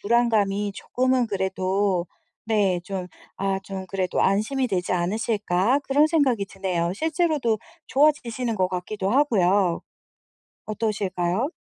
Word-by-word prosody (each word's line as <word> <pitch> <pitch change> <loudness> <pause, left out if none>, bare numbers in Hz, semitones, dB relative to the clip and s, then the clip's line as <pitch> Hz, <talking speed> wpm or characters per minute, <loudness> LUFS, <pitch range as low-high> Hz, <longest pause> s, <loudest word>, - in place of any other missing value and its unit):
불안감이 210 -3 +1
조금은 255 +1 0
그래도 190 -1 0 0.4
네. 200 -5 +1
좀 185 -2 -5 0.3
아 195 0 0
좀 190 -1 -6
그래도 185 -1 -1
'안심이 245 +6 +1
되지 185 -2 -1
않으실까.' 205 +5 +1
그런 290 +3 +4
생각이 270 -10 +2
드네요. 180 -3 -2
실제로도 310 - 0 0.3
좋아지시는 255 -5 +1
것 185 -1 +1
같기도 190 +2 -3
하고요. 200 -9 +3 0.9
어떠실까요? 210 0 -1
205 Hz, 285 characters per minute, -24 LUFS, 185-245 Hz, 0.9 s, 그런